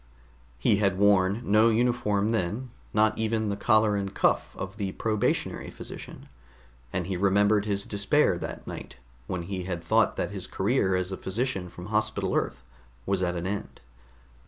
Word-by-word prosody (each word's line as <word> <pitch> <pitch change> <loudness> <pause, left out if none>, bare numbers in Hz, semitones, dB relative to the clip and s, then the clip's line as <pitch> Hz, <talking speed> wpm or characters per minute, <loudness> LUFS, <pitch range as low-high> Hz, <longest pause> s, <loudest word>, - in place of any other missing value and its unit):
He 100 - +3
had 100 -2 +1
worn 100 +2 +3
no 110 +2 +5
uniform 110 -3 +1
then, 110 +4 -2 0.2
not 110 0 +3
even 110 -1 0
the 100 - -1
collar 110 0 +3
and 100 -1 -2
cuff - - +1
of 95 +1 -6
the 100 -3 -3
probationary 110 -2 -1
physician, - - -9 0.6
and 90 -2 -2
he 95 +1 -2
remembered 100 +2 +3
his 100 -1 0
despair 100 -1 +2
that - - -6
night - - -8 0.3
when 90 -2 -3
he 95 0 -4
had 85 -2 -4
thought 110 +5 +3
that - - -2
his 95 -3 -6
career 100 -2 +1
as 90 +1 -1
a 95 - -3
physician 95 -3 -2
from 90 0 -10
Hospital 110 0 0
Earth 60 - -1 0.4
was 95 -1 0
at 90 -1 0
an 85 0 -3
end. 100 +2 -4
100 Hz, 165 wpm, -27 LUFS, 95-110 Hz, 0.6 s, no